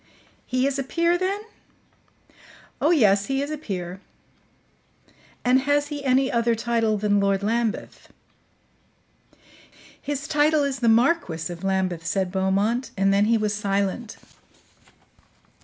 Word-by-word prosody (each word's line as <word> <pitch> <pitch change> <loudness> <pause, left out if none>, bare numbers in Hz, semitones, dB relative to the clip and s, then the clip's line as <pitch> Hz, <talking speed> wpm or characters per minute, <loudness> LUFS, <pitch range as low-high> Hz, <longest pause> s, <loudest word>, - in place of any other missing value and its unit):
"He 255 +1 0
is 275 0 -1
a - - -1
peer, 335 +5 +1
then?" 380 +3 -1 1.4
"Oh, 300 - +3
yes, 205 - +3
he 270 0 -1
is 290 - -5
a 305 - -3
peer." 185 - -6 1.4
"And 250 +1 +4
has 290 +2 0
he 290 -2 -5
any 265 0 +2
other 235 -1 +1
title 225 -1 0
than 205 0 +1
Lord 200 0 +1
Lambeth?" 225 +1 -2 1.9
"His 290 +1 -4
title 300 0 +2
is 275 -2 -2
the 235 -2 +2
Marquis 225 - +1
of 170 +2 -12
Lambeth," 190 -3 -1
said 190 +1 -1
Beaumont; 200 +6 0
and 195 0 +3
then 200 +1 +3
he 230 +1 +3
was 210 -1 -1
silent. 200 +2 -2
230 Hz, 130 wpm, -24 LUFS, 195-275 Hz, 1.9 s, And